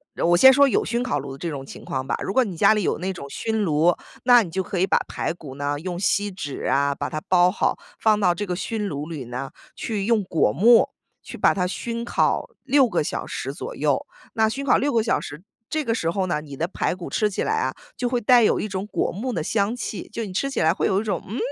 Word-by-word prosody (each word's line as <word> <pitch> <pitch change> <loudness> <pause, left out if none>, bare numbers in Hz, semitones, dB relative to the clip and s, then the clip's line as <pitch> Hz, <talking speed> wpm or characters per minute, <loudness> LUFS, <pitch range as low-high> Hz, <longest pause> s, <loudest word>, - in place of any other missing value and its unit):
呃 - - -1
我 175 +1 +5
先 265 +10 +9
说 280 +1 +5
有 265 - +1
熏 235 +1 -1
烤 250 -12 -1
炉 135 0 -7
的 - - -9
这 170 - -5
种 145 -4 -4
情 135 - -11
况 130 0 -3
吧。 - - 0
如 195 - -3
果 260 - +4
你 190 -7 -6
家 215 - +6
里 210 - 0
有 - - 0
那 190 +1 -3
种 140 -6 -9
熏 220 +8 -2
炉， 165 0 +3 0.3
那 245 -1 +7
你 175 - -7
就 190 +3 -2
可 185 - -3
以 190 - +2
把 - - +3
排 - - -2
骨 150 -6 -10
呢 145 +1 -2
用 175 +2 -5
锡 205 +1 +1
纸 145 -7 -6
呀 140 +1 +2
把 145 - -3
它 155 +3 -4
包 180 -1 +5
好， - - 0 0.2
放 215 -1 +3
到 180 -4 +3
这 205 +4 -4
个 180 - -2
熏 210 +2 -3
炉 145 -3 -4
里 155 -6 -6
呢， 125 +3 -5 0.2
去 210 -4 -3
用 230 -3 +3
果 165 - +1
木 225 - +5 0.3
去 - - -9
把 - - +4
它 180 -2 0
熏 235 +5 -4
烤 370 - 0
6 270 -1 +4
个 - - 0
小 - - -4
时 - - -4
左 - - -7
右。 - - 0 0.3
那 220 -1 +2
熏 275 +4 -4
烤 260 - +4
6 285 +2 0
个 230 -3 +2
小 225 - +1
时， 150 +4 -9 0.3
这 310 0 -1
个 230 - +1
时 165 -8 -1
候 190 +2 0
呢， 160 -4 -1
你 140 -3 -10
的 165 - -1
排 180 - -2
骨 180 -2 -8
吃 215 - +1
起 195 - -2
来 435 - 0
啊， - - -1 0.2
就 245 - -2
会 245 0 0
带 240 +2 +5
有 220 - +3
一 - - -2
种 195 0 -4
果 - - -1
木 245 +7 -4
的 165 -9 -2
香 205 +5 0
气。 225 -4 -6
就 230 0 -4
你 190 - -8
吃 275 +9 -1
起 270 - -2
来 160 +1 +4
会 - - 0
有 195 +1 +2
一 - - -3
种， 200 -6 -2
嗯？ 225 - -4
195 Hz, 285 characters per minute, -23 LUFS, 165-230 Hz, 0.3 s, 先